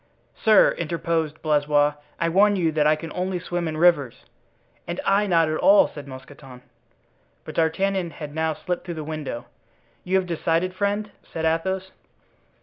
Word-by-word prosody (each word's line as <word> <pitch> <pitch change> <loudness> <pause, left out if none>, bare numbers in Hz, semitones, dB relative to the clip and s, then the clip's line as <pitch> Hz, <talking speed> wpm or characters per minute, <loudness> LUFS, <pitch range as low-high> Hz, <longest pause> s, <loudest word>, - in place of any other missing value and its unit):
"Sir," 220 -1 +5
interposed 165 -2 -2
Blaisois, 145 -1 +2 0.3
"I 170 - +1
warn 200 +4 +4
you 170 -4 +1
that 150 -1 +2
I 155 - +4
can 160 0 -8
only 185 0 -2
swim 175 -1 -3
in 155 -1 -4
rivers." 155 -7 +2 0.6
"And 170 +1 -4
I 205 +1 +3
not 165 -3 +3
at 155 0 -1
all," 295 0 +6
said 145 -2 -10
Mousqueton. 130 -1 -12 0.8
But - - -7
D'Artagnan 185 +3 0
had 150 -3 -8
now 160 0 -1
slipped 180 +3 -4
through 175 -2 -5
the 155 - -5
window. 150 -6 -5 0.6
"You 185 - -1
have 190 -1 +2
decided, 170 +1 -1
friend?" 205 +2 -2 0.2
said 160 0 -3
Athos. 190 +4 -1
165 Hz, 160 wpm, -23 LUFS, 155-185 Hz, 0.8 s, all